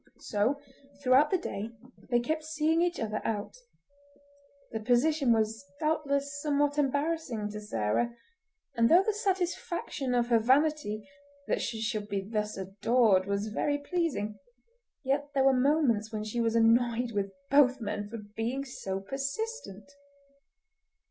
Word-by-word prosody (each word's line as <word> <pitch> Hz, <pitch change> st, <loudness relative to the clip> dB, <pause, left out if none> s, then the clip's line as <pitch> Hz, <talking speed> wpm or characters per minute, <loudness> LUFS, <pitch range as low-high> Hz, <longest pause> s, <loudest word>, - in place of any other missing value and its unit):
So, 225 Hz, +7 st, 0 dB, 0.4 s
throughout 260 Hz, +3 st, +5 dB
the 380 Hz, -, +2 dB
day, 220 Hz, -, -5 dB, 0.4 s
they 240 Hz, -1 st, +3 dB
kept 310 Hz, +6 st, -2 dB
seeing 315 Hz, +1 st, +1 dB
each 350 Hz, 0 st, 0 dB
other 215 Hz, -2 st, -2 dB
out. 210 Hz, -2 st, -3 dB, 1.2 s
The 220 Hz, -, -3 dB
position 250 Hz, +4 st, +2 dB
was 225 Hz, +2 st, +1 dB, 0.2 s
doubtless 285 Hz, -2 st, -1 dB
somewhat 290 Hz, 0 st, +1 dB
embarrassing 285 Hz, -5 st, -1 dB
to 210 Hz, 0 st, -6 dB
Sarah, 210 Hz, -, -1 dB, 0.6 s
and 230 Hz, 0 st, +3 dB
though 350 Hz, +4 st, +7 dB
the 435 Hz, -, 0 dB
satisfaction 350 Hz, -, -2 dB
of 240 Hz, 0 st, +1 dB
her 230 Hz, -1 st, +5 dB
vanity 260 Hz, -3 st, +1 dB, 0.4 s
that -, -, 0 dB
she 225 Hz, -, -3 dB
should 215 Hz, -2 st, -2 dB
be 195 Hz, -1 st, -2 dB
thus 210 Hz, -1 st, -2 dB
adored 195 Hz, +1 st, +2 dB
was 200 Hz, +2 st, -1 dB
very 290 Hz, +6 st, 0 dB
pleasing, 285 Hz, -, -2 dB, 0.6 s
yet 285 Hz, +2 st, 0 dB
there 270 Hz, -, +4 dB
were 270 Hz, 0 st, +5 dB
moments 255 Hz, -5 st, +2 dB
when 215 Hz, -1 st, -3 dB
she 215 Hz, +3 st, -2 dB
was 230 Hz, 0 st, +1 dB
annoyed 235 Hz, +1 st, +3 dB
with 200 Hz, -2 st, -2 dB, 0.2 s
both 275 Hz, -2 st, +5 dB
men 205 Hz, -2 st, -4 dB
for 230 Hz, -, -6 dB
being 225 Hz, +6 st, -4 dB
so 195 Hz, -7 st, -5 dB
persistent. 275 Hz, -, -5 dB
240 Hz, 140 wpm, -29 LUFS, 215-290 Hz, 1.2 s, though